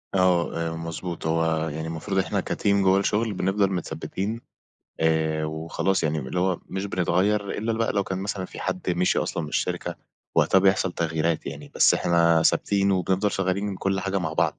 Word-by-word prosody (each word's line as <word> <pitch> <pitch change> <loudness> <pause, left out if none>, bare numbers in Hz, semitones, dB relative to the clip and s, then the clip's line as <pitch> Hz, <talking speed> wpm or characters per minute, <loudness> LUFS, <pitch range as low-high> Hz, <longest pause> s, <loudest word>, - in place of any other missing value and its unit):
آه، 90 -3 +2
آآ، 80 - -5
مضبوط، 85 +1 -5
هو 80 0 +1
يعني 80 +2 -5
المفروض 80 +4 -3
إحنا 95 - 0
كَteam 100 - +1
جُوَّه 95 0 +4
الشغل، 105 +2 0
بنفضل 95 +1 +1
متثبِّتين، 100 +4 -3 0.6
آآ 80 -1 +1
وخلاص 80 +5 -1
يعني، 80 -1 0
اللي 75 +6 -3
هو 95 -1 0
مش 95 +1 -3
بنتغيَّر 100 +3 +1
إلا 110 +2 -2
ل 110 - -3
بقى 115 - +1
لو 100 -1 +1
كان 95 0 -3
مثلًا 95 -1 -3
في - - -9
حَدّ 90 - -2
مِشي 90 +1 +2
أصلًا - - -2
من 75 - -5
الشركة، 75 - -2 0.4
وقتها 95 - +5
بيحصل 95 -1 +2
تغييرات 80 -1 -1
يعني، - - -7
بس - - +5
إحنا 85 -1 +3
ثابتين 100 +4 +2
وبنفضل 95 +2 +1
شغَّالين 95 +1 -1
من 100 -2 -3
كل 95 +1 -1
حاجة 95 0 -1
مع 80 -4 -3
بعض، - - 0
90 Hz, 185 wpm, -25 LUFS, 80-95 Hz, 0.6 s, وقتها